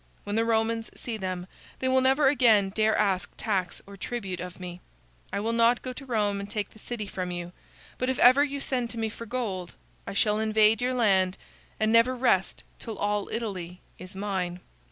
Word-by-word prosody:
When 205 - -3
the 225 +1 +2
Romans 225 0 +1
see 235 - -4
them 185 -3 -4 0.3
they 260 - -1
will 260 0 +4
never 270 +2 +4
again 230 -7 +5
dare 220 +1 +2
ask 195 -3 +1
tax 195 -5 -1
or 200 - -11
tribute 195 -3 -4
of 180 +1 -7
me. 180 -1 -7 0.5
I - - -1
will 225 +3 -1
not 235 +1 +3
go 255 - -4
to 275 +2 -9
Rome 210 -4 0
and 200 0 -6
take 205 0 -3
the 220 - -15
city 225 -1 -5
from 185 -2 -4
you, 175 0 -5 0.5
but 255 - 0
if 260 - 0
ever 255 +4 +7
you 280 -1 -3
send 250 -4 -1
to 235 - -7
me 225 -1 -1
for 230 +1 -9
gold, 200 -8 -3 0.3
I - - -4
shall 210 +1 +2
invade 220 +1 +4
your 255 +1 0
land 190 -6 +3 0.4
and 215 0 +2
never 230 +3 +5
rest 240 -7 +1 0.2
till 225 -3 -6
all 205 0 -1
Italy 185 -6 -4 0.2
is 185 +2 -10
mine." 190 -3 -3
215 Hz, 200 wpm, -27 LUFS, 190-240 Hz, 0.5 s, ever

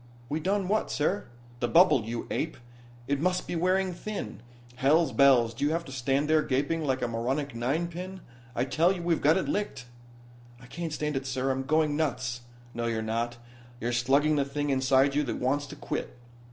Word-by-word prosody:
"We 150 +2 -1
done 195 +3 0
what, 215 +3 +1
sir?" 180 +7 0 0.3
"The 120 - 0
bubble, 150 - +5
you 115 +1 -4
ape 160 - -2 0.5
it 140 0 0
must 180 +1 +1
be - - -4
wearing 185 +2 +1
thin. 175 - -6 0.4
Hell's 150 +5 +3
bells, 130 -5 +5
do 115 - -5
you 145 - +3
have 165 +2 -1
to 135 - -9
stand 135 +3 0
there 155 0 +4
gaping 145 +4 0
like 130 -3 0
a - - +1
moronic 130 +5 -2
ninepin? 170 +10 -3 0.3
I 120 - +1
tell 160 +6 +3
you, 180 -3 -3
we've 170 -2 +1
got 155 +4 +5
it 190 - -1
licked." 205 -11 -2 0.7
"I 125 - -14
can't 165 +5 -5
stand 150 -1 -2
it, 135 0 -2
sir. 130 +1 0
I'm 130 0 -1
going 155 0 +2
nuts." 125 -5 -1 0.3
"No 115 0 -2
you're 110 -1 -1
not. 115 +2 -2 0.4
You're 120 0 -2
slugging 140 +5 +3
the 140 - +3
thing 145 +1 -2
inside 135 +1 +3
you 145 - +2
that 135 - -2
wants 145 +3 0
to 145 - -9
quit. 140 - -5
145 Hz, 195 wpm, -28 LUFS, 130-165 Hz, 0.7 s, bubble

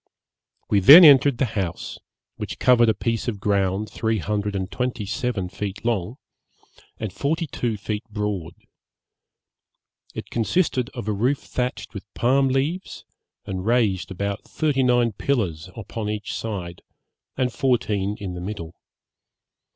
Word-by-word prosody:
'We 100 - +5
then 150 - +10
entered 140 -3 +7
the 135 - +2
house, 100 -7 -4 0.4
which - - -6
covered 120 -2 +5
a 110 - +2
piece 115 +3 -2
of 110 -4 -2
ground 100 0 0
three 110 +1 -1
hundred 105 +2 -2
and 95 -1 -3
twenty 125 -4 -2
seven 110 -3 -2
feet 100 +3 -6
long, 115 0 -1 0.8
and 110 -4 -5
forty 155 - -1
two 120 -6 -3
feet 105 +2 -4
broad. 105 -5 -3 1.6
It - - -7
consisted 125 +1 0
of 120 -4 -6
a - - +1
roof 125 +8 +1
thatched 125 0 -4
with 100 -1 -9
palm 135 +3 +3
leaves, 140 +8 -2 0.4
and 95 -2 -4
raised 110 -4 +1
upon 100 +1 -3
thirty 145 0 -1
nine 120 -2 +3
pillars 95 - -2
on 110 -1 -5
each 105 0 -4
side, 90 -6 -5 0.6
and 125 -2 0
fourteen 105 -6 0
in 95 -3 -5
the 90 - -6
middle. 90 -4 -6
110 Hz, 140 wpm, -23 LUFS, 100-125 Hz, 1.6 s, then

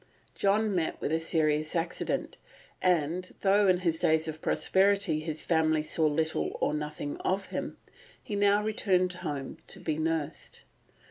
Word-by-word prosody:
John 205 +1 +1
met 170 -4 -1
with - - -2
a 160 - +2
serious 155 -1 +1
accident, 165 0 -2 0.4
and, 180 0 0
though 200 +1 +4
in 180 -1 +3
his 165 -3 0
days 160 0 +2
of 155 0 -6
prosperity 195 -4 +2
his 155 0 -4
family 160 -2 +2
saw 155 0 +1
little 160 +1 -1
or - - +1
nothing 150 -1 -4
of 190 +1 -2
him, - - -4 0.4
he 210 - -6
now 205 +1 +3
returned 185 -4 +1
home 150 -7 -5
to - - -4
be 155 -1 -2
nursed. 160 -2 -3
165 Hz, 150 wpm, -29 LUFS, 155-190 Hz, 0.4 s, though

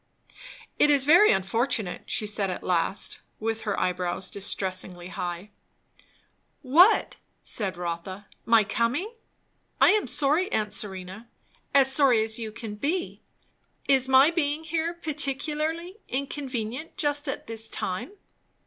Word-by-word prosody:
"It 295 - +5
is 280 -2 +4
very 350 +8 +7
unfortunate!" 205 +1 -1
she 215 - +1
said 205 -2 -1
at 180 - -5
last, 180 +2 0 0.2
with 225 0 -2
her 205 - -1
eyebrows 180 +1 -2
distressingly 185 -2 -4
high. 180 +3 -5 1.1
"What?" 340 +11 +5 0.3
said 195 -5 -1
Rotha. 175 +3 -5 0.2
"My 230 -1 +5
coming? 245 - -1 0.7
I - - +7
am 425 0 +1
sorry, 305 +7 +1
aunt 210 -1 -1
Serena; 190 +2 -3 0.4
as 270 -1 +5
sorry 260 -6 +4
as 220 +1 -2
you 220 -2 -5
can 215 0 -7
be. 315 - -3 0.7
Is 265 -1 +3
my 265 +4 +6
being 310 -2 -1
here 325 +2 -2
particularly 310 +3 -3
inconvenient 265 0 -4
just 290 0 -1
at 270 - -4
this 225 0 -4
time?" 185 - -4
240 Hz, 125 wpm, -26 LUFS, 200-295 Hz, 1.1 s, very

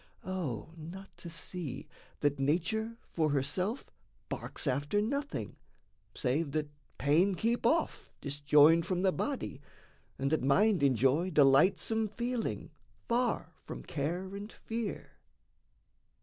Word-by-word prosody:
O 160 - -3
not 175 +5 -10
to 170 - -8
see 165 -2 -6 0.3
that 145 -1 +1
nature 185 +11 0 0.2
for 155 -2 +2
herself 165 - -1 0.4
Barks - - -4
after 145 +8 +1
nothing, 280 +7 -2 0.6
save 140 +3 0
that 150 -1 -1 0.3
pain 170 +8 +3
keep 230 +6 +1
off, 325 +1 0
Disjoined 145 +3 +4
from 185 -1 0
the 190 - +4
body, 270 - -3 0.6
and 135 +2 -1
that 155 - +2
mind 190 +7 +4
enjoy 135 - +3
Delightsome 185 +9 +4
feeling, 225 - -3 0.4
far 235 -9 0
from - - -7
care 175 +6 -3
and 205 +2 -7
fear! 225 -2 -5
170 Hz, 115 wpm, -32 LUFS, 145-210 Hz, 0.6 s, Disjoined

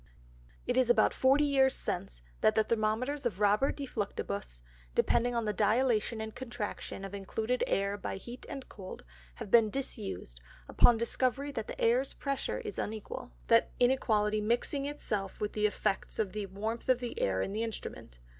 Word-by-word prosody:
It 245 - 0
is 255 -2 +4
about 240 - +5
forty 270 +3 +4
Years 270 -2 +4
since, - - -4 0.2
that 215 - +4
the 220 - +4
Thermometers 230 +6 0
of 200 -5 -6
Robert 210 +6 +3
de 280 - -3
Fluctibus, 100 - -4 0.3
depending 245 +1 +2
on 230 -1 0
the 210 - 0
Dilatation 220 +2 +2
and 220 0 -5
Contraction 235 -5 -5
of 195 - -8
included 220 +5 -1
Air 200 +1 0
by 200 - -4
Heat 240 +6 -9
and 270 - -6
Cold, 190 -2 -9 0.3
have 195 - -8
been 225 -2 +6
disused, 95 - -5 0.3
upon 240 - +5
discovery 255 +4 0
that 225 -5 -4
the - - -7
Airs 245 +4 +3
pressure 275 -1 -2
is 425 -3 -5
unequal; 215 - -5
that - - +4
inequality 215 -4 +3
mixing 240 +6 0
it 290 0 -5
self 195 -3 -2
with 210 - -2
the 210 0 +3
Effects 205 -1 -2
of 210 -4 0
the 210 -2 -4
warmth 220 +6 -4
of 255 - +5
the 245 -1 -5
Air 95 -1 +1
in 195 - -4
that 215 - -2
Instrument. 220 - -5
220 Hz, 175 wpm, -31 LUFS, 205-255 Hz, 0.3 s, been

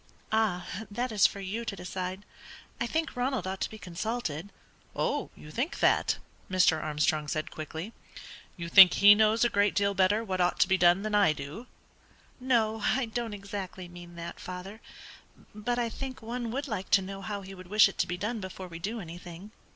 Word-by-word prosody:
"Ah, 210 -5 +1 0.2
that 240 +4 -2
is 210 -3 +5
for 200 - -8
you 200 +4 -4
to 220 - -4
decide. 185 +1 -5 0.5
I 235 - 0
think 320 +4 -2
Ronald 250 -5 -1
ought 190 0 -4
to - - 0
be 220 - -10
consulted." 180 -2 -4 0.5
"Oh, - - -1
you 150 - -12
think 255 - -2
that?" - - +3 0.3
Mr. 180 -4 +3
Armstrong 150 0 0
said, 155 +1 -3
quickly. 160 +7 -6 0.6
"You 170 -1 -5
think 185 +1 +9
he 205 +1 +9
knows 220 +2 +3
a - - +6
great 205 -1 +2
deal 200 0 +2
better 195 +3 +3
what 185 -4 -2
ought 175 - +1
to - - +5
be 190 - +3
done 180 +1 +4
than 215 0 -3
I 200 -6 +5
do?" 150 - -8 0.7
"No, 225 -4 +1
I 265 -1 +2
don't 225 -1 -4
exactly 195 -2 -6
mean 175 0 -12
that, 170 0 -7
father; 185 +4 -8 0.7
but 215 +4 -2
I 240 -1 +1
think 260 +1 -7
one 235 +1 -4
would 275 +5 -3
like 205 -6 -4
to 195 - -4
know 195 +1 -7
how 200 0 -4
he 195 0 -10
would 185 -1 -11
wish 210 +3 +6
it 195 - -9
to - - +2
be 180 - -3
done 215 +4 -2
before 185 -1 -7
we 165 -2 -9
do 215 +7 -3
anything. 175 +2 -9
195 Hz, 195 wpm, -29 LUFS, 180-220 Hz, 0.7 s, think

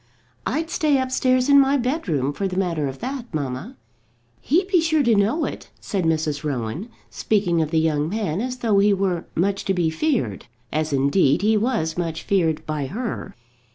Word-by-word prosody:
"I'd 320 +6 -2
stay 300 -5 +2
upstairs 255 0 +1
in 280 -1 +7
my 275 +1 +4
bedroom, 205 - -1
for 195 +6 -2
the 185 -1 -5
matter 170 -6 0
of 135 0 -6
that, 255 -1 -5
mamma." 135 -5 -4 0.6
"He'd 355 +7 +1
be 370 -3 +3
sure 315 -2 +2
to 235 -3 +4
know 215 +10 +2
it," - - -7
said 190 -4 -2
Mrs. 155 -2 0
Rowan, 145 - -3 0.2
speaking 180 -6 +1
of 155 - -1
the 160 - 0
young 155 -1 +1
man 200 -3 -2
as 250 +1 -3
though 220 -5 +2
he 200 0 +4
were 185 -3 -1
much 195 +3 0
to 195 - +1
be 170 -3 +1
feared; 160 - -1 0.3
as 155 +1 0
indeed 140 +4 +2
he 220 +1 +4
was 205 -8 0
much 165 -2 -3
feared 165 -6 +1
by 150 -3 -2
her. 230 - -5
195 Hz, 185 wpm, -22 LUFS, 155-250 Hz, 0.6 s, in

